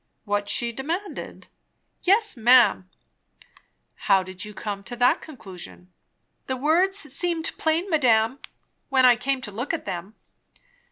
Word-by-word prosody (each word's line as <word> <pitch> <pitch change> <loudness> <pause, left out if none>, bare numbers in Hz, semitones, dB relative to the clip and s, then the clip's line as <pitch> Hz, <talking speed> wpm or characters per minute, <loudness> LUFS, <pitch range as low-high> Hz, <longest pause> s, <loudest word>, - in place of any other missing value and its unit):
"What 205 -1 -1
she 235 +2 +1
demanded?" 330 - -5 0.5
"Yes, 420 +4 +3
ma'am." 235 - +4 1.2
"How 195 -1 +5
did 185 0 -8
you 210 - -7
come 200 -1 -6
to 245 - -6
that 245 +1 +3
conclusion?" 175 - -11 0.5
"The 260 - -2
words 345 +8 +2
seemed 330 0 -2
plain, 325 +4 +1
madame, 255 - +2 0.5
when 260 -2 +4
I 245 -1 +7
came 260 +2 -2
to 210 - -4
look 245 +10 -3
at 315 -1 -8
them. 185 - -6
250 Hz, 130 wpm, -24 LUFS, 205-315 Hz, 1.2 s, I